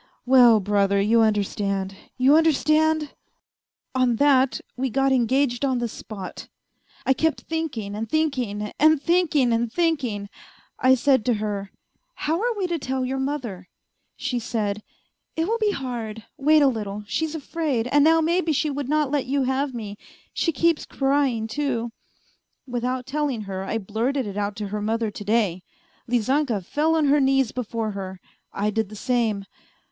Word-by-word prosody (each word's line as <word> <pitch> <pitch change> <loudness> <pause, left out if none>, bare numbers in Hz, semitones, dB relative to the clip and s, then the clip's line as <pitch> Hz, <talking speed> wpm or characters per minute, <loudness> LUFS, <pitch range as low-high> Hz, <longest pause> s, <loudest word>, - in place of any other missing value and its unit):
Well, 245 -3 +7
brother, 200 0 +2
you 225 +3 +4
understand! 200 -2 0 0.2
You 265 +3 +5
understand?... 315 -1 +2 0.8
On 255 -2 +2
that 270 0 +3 0.2
we 260 +1 -1
got 270 +3 +1
engaged 260 0 +1
on 260 -2 +1
the 240 0 -1
spot. 210 -4 -8 0.6
I 265 - +4
kept 320 +3 0
thinking 275 -11 -4
and 220 +1 -4
thinking 250 -10 -1
and 310 0 +5
thinking 305 -6 +2
and 230 0 0
thinking, 265 -11 0 0.5
I 260 0 +5
said 260 -2 +3
to 245 - +2
her, 205 -2 -3 0.2
' - - -48
How 320 +5 +1
are 470 -1 0
we 390 - 0
to 345 -2 -2
tell 260 -1 -2
your 265 +1 -2
mother? 255 -10 -4 0.2
' - - -50
She 255 -3 -2
said, 215 -3 -2 0.3
' - - -53
It 325 - +1
will 460 +2 0
be 430 -1 +2
hard, 235 - -4
wait 300 +2 +4
a - - +6
little; 210 -4 -3
she's 320 +8 -2
afraid, 300 -6 -2
and 290 0 +5
now 325 +1 +5
maybe 335 0 +1
she 300 +1 0
would 280 -1 -4
not 300 -2 +1
let 290 -4 0
you 275 +1 +1
have 265 +1 -1
me; 210 -3 -6 0.3
she 335 - +1
keeps 330 +2 +1
crying, 270 -5 0
too.' 240 -1 -2 0.7
Without 250 0 -2
telling 275 -4 -2
her 190 -2 -5
I 225 - -1
blurted 225 +6 -1
it 200 -2 -6
out 205 0 -2
to 210 -2 -5
her 210 +1 -3
mother 220 +1 -1
to 205 - -8
day. 205 -4 +1 0.5
Lizanka 245 -1 +1
fell 315 - +1
on 315 -2 +2
her 290 +1 +4
knees 270 -3 +2
before 230 -3 -3
her, 190 -2 -6 0.3
I 210 +1 -1
did 220 -1 -1
the 215 - -10
same 220 -3 0
255 Hz, 170 wpm, -24 LUFS, 215-290 Hz, 0.8 s, Well